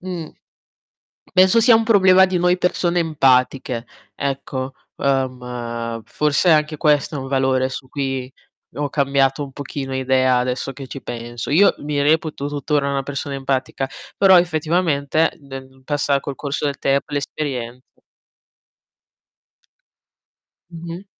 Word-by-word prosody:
mh. 180 -4 -6 1.0
Penso 190 +4 +6
sia 230 0 +6
un 225 - +3
problema 190 -4 +6
di 185 -1 -1
noi 180 +1 +2
persone 180 -1 0
empatiche, 130 -5 +1 0.3
ecco. 135 -1 -3 0.2
Ehm, 125 -4 -2
forse 150 +4 +1
anche 155 -1 +3
questo 150 +1 +2
è - - -2
un 135 -1 -5
valore 130 -1 +1
su 130 0 -8
cui 135 -2 -3 0.4
ho 145 0 -1
cambiato 140 0 +1
un 140 - -8
pochino 135 -1 -6
idea 130 -1 +2
adesso 125 +2 -2
che 135 -1 -9
ci 135 - -8
penso. 120 0 -6
Io 180 +8 +5
mi 145 -1 -2
reputo 155 -1 +1
tuttora 145 0 -1
una 140 -1 -1
persona 140 0 -4
empatica, 135 0 -2 0.3
però 190 -2 +6
effettivamente 160 -2 +1
nel 135 -1 -11
passa 145 0 0
col 140 0 -5
corso 140 +1 -4
del 140 - -3
temp 140 0 0
l' 145 - -1
esperienze. 130 -4 -5 2.7
Mh-mh. 170 +2 -8
140 Hz, 130 wpm, -20 LUFS, 130-155 Hz, 2.7 s, Penso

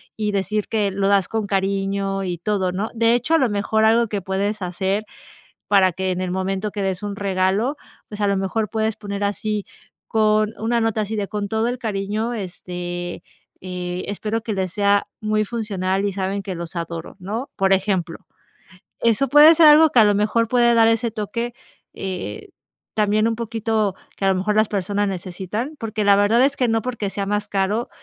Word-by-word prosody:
y 210 -1 -1
decir 200 +1 -1
que 210 -3 0
lo 195 0 0
das 200 -2 +3
con 220 -2 -2
cariño 195 0 -1
y 180 -2 -3
todo, 190 +1 -1
¿no?, 200 +5 -3
de 230 0 +3
hecho, 245 +7 0
a 325 - +5
lo 255 - +2
mejor 215 +1 0
algo 230 +1 +4
que 205 -1 -2
puedes 200 +3 -2
hacer, 190 +3 -1 0.6
para 190 -3 +4
que 190 +2 -2
en 180 - -2
el 185 -1 -2
momento 190 +2 -2
que 205 - -4
des 190 -2 -1
un 205 -1 -3
regalo, 200 +7 0 0.3
pues, 210 - -8
a 205 - +2
lo 200 - +2
mejor 195 +3 -1
puedes 220 -1 -1
poner 205 -1 -5
así 205 +1 -1 0.5
con 215 -1 +2
una 235 +1 +1
nota 225 -1 0
así 215 +1 -3
de: 205 -2 -3
"Con 205 -1 -3
todo 220 +3 0
el 245 - -3
cariño, 215 +1 -2
este, 175 -3 -5 0.4
eh, 180 0 -4
espero 215 +2 -2
que 225 - -3
les 190 -2 -2
sea 200 -1 +2
muy 215 0 +1
funcional 200 -4 -2
y 200 - 0
saben 195 +1 -2
que 190 - -4
los 170 0 -7
adoro", 170 -1 -5
¿no?, 215 +8 -4
por 195 0 +1
ejemplo. 190 -3 0 0.8
Eso 235 +4 +2
puede 295 +4 +8
ser 325 -1 +7
algo 310 +1 +7
que 250 - +2
a - - +7
lo 205 -1 +4
mejor 210 +3 +2
puede 240 0 +4
dar 225 -1 +5
ese 230 +1 +1
toque, 230 +3 -4 0.4
eh, 180 - -6 0.4
también 215 0 +2
un 230 - 0
poquito 225 -3 -1 0.2
que - - -4
a - - +4
lo 190 - +2
mejor 200 +3 0
las 215 0 +4
personas 205 +1 -1
necesitan 190 - -4
porque, 220 -2 -2
la 200 0 +6
verdad 215 +5 +4
es 280 +1 +1
que 250 - +1
no 225 0 +2
porque, 230 -5 -3
sea 195 0 -3
más 205 +1 -1
caro 200 +4 0
205 Hz, 200 wpm, -21 LUFS, 190-220 Hz, 0.8 s, puede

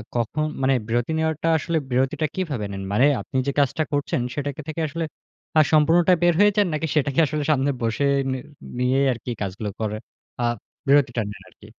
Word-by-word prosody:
কখন 120 +6 0 0.2
মানে 135 +1 +3
বিরতি 120 +5 0
নেওয়ারটা 160 0 -1
আসলে 165 +2 -1
বিরতিটা 130 +5 +1
কিভাবে 150 - -2
নেন? 95 0 -5
মানে 120 +6 +4 0.2
আপনি 135 - -5
যে - - +2
কাজটা 145 +3 +2
করছেন 145 -3 0
সেটা 145 0 -2
কে 155 - -7
থেকে 155 +1 -3
আসলে 165 +3 -3 0.5
আ - - +8
সম্পূর্ণটা 165 +4 +5
বের 175 0 +5
হয়ে 205 0 +6
যান 205 -3 +4
নাকি 155 +1 -1
সেটাকে 140 0 +1
আসলে 150 0 -2
সামনে 140 -1 +2
বসে 115 +4 0 0.3
নি 130 - -1 0.4
নিয়েই 130 +2 +2
আরকি 120 +1 -6
কাজগুলো 100 +2 -3
করেন? 110 -1 -2 0.4
আ - - 0 0.4
বিরতিটা 135 -4 +3
নেন 105 - -9
আরকি। - - -19
140 Hz, 185 wpm, -23 LUFS, 120-155 Hz, 0.5 s, আ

